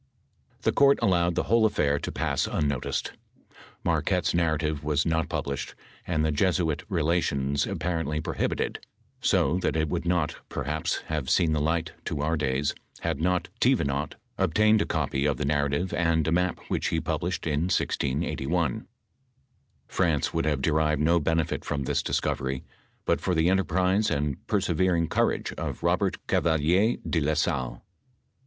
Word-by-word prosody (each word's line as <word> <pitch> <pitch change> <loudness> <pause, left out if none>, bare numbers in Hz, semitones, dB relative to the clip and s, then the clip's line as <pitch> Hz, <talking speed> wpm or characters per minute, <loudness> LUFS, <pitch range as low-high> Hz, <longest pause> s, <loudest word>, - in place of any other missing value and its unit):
The - - +3
court 140 0 +5
allovted 90 -6 +2
the - - +1
whole 110 0 +4
afiair 70 -7 +1
to - - -3
pass - - -1
unnotlcfxl. 70 -3 -1 0.7
Mar - - +2
quette's - - 0
narrative 80 -3 0
was 75 0 +1
not 80 -1 0
published, 70 -1 -3 0.3
and 80 -3 +1
the 80 - +1
Jesuit 80 0 +1
Bolations 75 -6 0
apparently 80 -3 -1
prohibited; 80 0 -2 0.4
so 85 +7 +2
that - - -1
it 80 -1 0
would 85 - -2
not, 85 -3 0
perhaps, 75 +2 -2
have 75 -4 -3
seen 85 -4 +3
the 75 -1 +1
light 80 +1 0
to 75 - -2
our 80 +2 +1
days, 70 -1 0 0.3
had 70 - -2
not 90 +1 +1
Thevenot 70 +2 +1 0.2
obtained 105 +4 +4
a - - -1
copy 70 +1 -1
of 70 - 0
the 75 - -2
narrative 70 +4 0
and 85 -2 +1
a - - +1
map 90 +1 +1
which - - -1
he - - 0
published 90 -1 -2
in 80 +2 0
1681.* 70 -2 -1 1.0
France 80 -6 0
would 80 - 0
have 75 -3 0
derived 75 0 +2
no 85 +2 +4
benefit 80 +1 0
from 70 -2 -2
this - - 0
discovery, 65 0 -1 0.4
but - - +1
for 90 - 0
the 80 +2 +3
enterprise 95 +3 +2
and 70 -1 -2
persevering 90 -3 +1
courage - - 0
of - - -4
Bobert - - +1
Oavalier 85 +8 +2
de 85 - +1
la 75 +2 +1
Salle. 70 -6 -1
80 Hz, 155 wpm, -27 LUFS, 75-90 Hz, 1.0 s, court